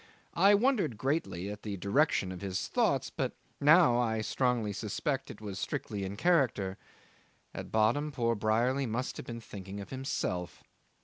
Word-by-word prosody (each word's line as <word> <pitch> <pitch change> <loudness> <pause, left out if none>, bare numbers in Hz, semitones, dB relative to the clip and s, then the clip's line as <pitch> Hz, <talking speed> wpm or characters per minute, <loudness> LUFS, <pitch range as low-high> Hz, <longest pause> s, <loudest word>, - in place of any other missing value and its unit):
I 200 +4 +6
wondered 215 - +2
greatly 105 - -1
at 105 0 -8
the 100 -2 -4
direction 100 - +2
of 90 - -7
his 95 -2 -2
thoughts, - - +1
but - - -2 0.3
now 150 -4 +6
I 110 -2 +1
strongly 120 -2 0
suspect 130 +7 -2
it - - -10
was 100 -3 -5
strictly 100 -2 -3
in 95 +1 -5
character: 125 - +2 0.7
at - - -7
bottom 120 +8 +2
poor 120 -4 +1
Brierly 120 +5 +1
must 120 +4 -3
have - - -8
been 115 -1 -6
thinking 100 -2 -8
of 100 - -8
himself. 90 - -3
115 Hz, 160 wpm, -31 LUFS, 100-135 Hz, 0.7 s, I